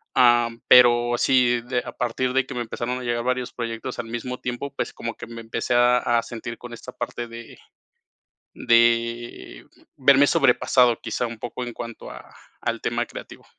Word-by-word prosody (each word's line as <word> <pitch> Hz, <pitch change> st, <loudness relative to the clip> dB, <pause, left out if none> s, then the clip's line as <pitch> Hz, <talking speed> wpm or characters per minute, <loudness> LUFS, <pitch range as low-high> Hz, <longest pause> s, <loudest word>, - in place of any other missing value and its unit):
Am, 120 Hz, -2 st, +4 dB
pero 120 Hz, -1 st, +6 dB
sí 125 Hz, -2 st, +3 dB, 0.2 s
a 120 Hz, -, -6 dB
partir 125 Hz, +1 st, -2 dB
de 135 Hz, 0 st, +2 dB
que -, -, -7 dB
me 120 Hz, -, -2 dB
empezaron 120 Hz, +2 st, -4 dB
a -, -, -7 dB
llegar 120 Hz, -1 st, -1 dB
varios 125 Hz, -1 st, -1 dB
proyectos 120 Hz, +1 st, -5 dB
al 120 Hz, -, -3 dB
mismo 120 Hz, +2 st, -5 dB
tiempo, 125 Hz, +3 st, -5 dB
pues -, -, -3 dB
como -, -, -5 dB
que -, -, -9 dB
me 115 Hz, 0 st, -9 dB
empecé 115 Hz, +2 st, -3 dB
a 120 Hz, 0 st, +5 dB
a 120 Hz, -1 st, +1 dB
sentir 115 Hz, 0 st, -7 dB
con 120 Hz, -1 st, -10 dB
esta 125 Hz, +2 st, -9 dB
parte 120 Hz, -1 st, -5 dB
de 115 Hz, 0 st, -11 dB, 1.0 s
de 115 Hz, 0 st, +1 dB, 0.3 s
verme 140 Hz, +1 st, +5 dB
sobrepasado, 125 Hz, -5 st, +3 dB
quizá 120 Hz, -, -2 dB
un 115 Hz, -1 st, -8 dB
poco 125 Hz, +1 st, -5 dB
en 120 Hz, -, -6 dB
cuanto 115 Hz, -1 st, -8 dB
a -, -, -13 dB, 0.3 s
al -, -, -2 dB
tema -, -, -1 dB
creativo. -, -, -11 dB
120 Hz, 175 wpm, -23 LUFS, 115-125 Hz, 1.0 s, pero